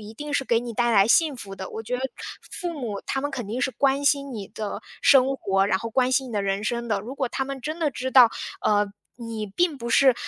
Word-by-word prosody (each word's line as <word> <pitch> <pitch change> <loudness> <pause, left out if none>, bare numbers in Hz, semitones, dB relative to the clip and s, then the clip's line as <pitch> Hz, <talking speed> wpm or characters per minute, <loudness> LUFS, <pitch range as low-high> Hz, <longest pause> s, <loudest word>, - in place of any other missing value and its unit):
一 215 +1 -10
定 295 +5 -6
是 280 - +1
给 235 -3 +2
你 240 -1 -6
带 240 +1 +1
来 200 -2 +5
幸 295 +2 +4
福 195 -4 -8
的。 190 -1 -7
我 220 - -6
觉 235 +3 -3
得 - - -5 0.5
父 350 -1 -4
母 235 -9 -5
他 270 - -2
们 290 +1 -2
肯 245 -6 -5
定 235 +5 -3
是 - - +1
关 275 +1 +1
心 280 -1 +2
你 205 -5 -6
的 210 0 -5 0.2
生 270 0 +5
活， 195 -3 +1
然 - - +1
后 230 - -5
关 255 +1 +2
心 260 0 +1
你 - - -8
的 205 - 0
人 195 +1 -1
生 235 +1 -2
的， 210 -3 +1
如 235 +6 -7
果 265 -3 -1
他 265 - -2
们 275 0 -6
真 310 +5 -4
的 310 -3 +1
知 260 +1 -4
道， 245 -4 +8 0.3
呃， 205 -1 +3 0.3
你 225 -3 -5
并 315 - 0
不 235 -2 -5
是， 265 +1 +6
240 Hz, 280 characters per minute, -25 LUFS, 215-270 Hz, 0.5 s, 道